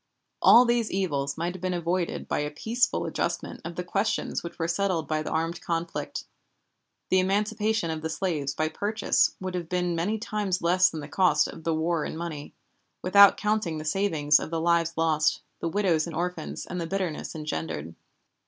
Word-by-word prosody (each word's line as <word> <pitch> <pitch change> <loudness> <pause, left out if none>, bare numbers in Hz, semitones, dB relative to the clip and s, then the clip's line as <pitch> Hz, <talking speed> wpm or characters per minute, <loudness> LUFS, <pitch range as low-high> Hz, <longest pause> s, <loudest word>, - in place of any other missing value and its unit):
All 245 +2 +8
these 235 -2 +1
evils 145 -7 -1
might 170 +2 -2
have 185 - -10
been 185 -1 -1
avoided 175 +1 -2
by - - -1
a 150 0 -1
peaceful 225 +11 0
adjustment - - -3
of 170 +1 -6
the 180 - -3
questions 195 +4 -1
which 170 - -8
were 165 - -1
settled 175 -3 0
by 155 0 0
the - - -4
armed 165 +1 -2
conflict. 170 0 -3 0.9
The 185 - +5
emancipation 210 0 0
of 160 -1 -4
the 160 - -3
slaves 155 -5 -2
by 155 +1 0
purchase 205 +6 +1
would 185 -1 -4
have 175 -2 -4
been 180 -1 0
many 190 +7 0
times 210 -4 -2
less 180 +2 +4
than 160 - -6
the 145 - -7
cost 150 -2 +3
of 165 - -10
the 165 -1 +1
war 160 0 0
in - - -5
money, 160 -4 -6 0.5
without 200 +2 +7
counting 210 -6 0
the 155 - -6
saving 160 -4 -1
of - - -5
the 165 0 -2
lives 165 0 +2
lost, 155 -2 +2 0.2
the 165 - -2
widows 170 -4 +1
and 165 - -6
orphans, 180 +2 -3
and 180 - -4
the 165 - -3
bitterness 185 -5 -3
engendered. 80 - -4
170 Hz, 190 wpm, -27 LUFS, 160-190 Hz, 0.9 s, All